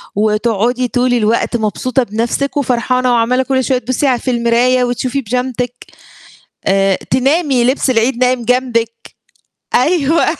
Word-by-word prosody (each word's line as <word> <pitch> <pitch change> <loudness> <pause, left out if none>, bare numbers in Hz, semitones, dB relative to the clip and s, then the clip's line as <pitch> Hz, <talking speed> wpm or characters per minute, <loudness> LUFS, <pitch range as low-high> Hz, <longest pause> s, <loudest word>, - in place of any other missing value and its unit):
وتقعدي 220 +3 0
طول 245 0 0
الوقت 230 +1 +1
مبسوطة 245 +4 -1
بنفْسك 235 +7 -2
وفرحانة، 255 -1 0
وعمّالة 245 +3 +2
كُلّ 260 -1 0
شوية 255 +1 +1
تبُصّي 255 +3 -1
على 250 -2 +1
في 255 - -2
المراية، 240 +2 +2
وتشوفي 250 +2 -2
بيجامتِك، 250 +1 -3 0.9
آآ 195 -1 +2
تنامي 270 -1 +1
لبس 260 +2 +1
العيد 235 +1 +1
نايم 250 -2 +1
جنبك، 230 -2 -1 0.6
أيوه 315 +3 +2
250 Hz, 125 wpm, -15 LUFS, 230-255 Hz, 0.9 s, وعمّالة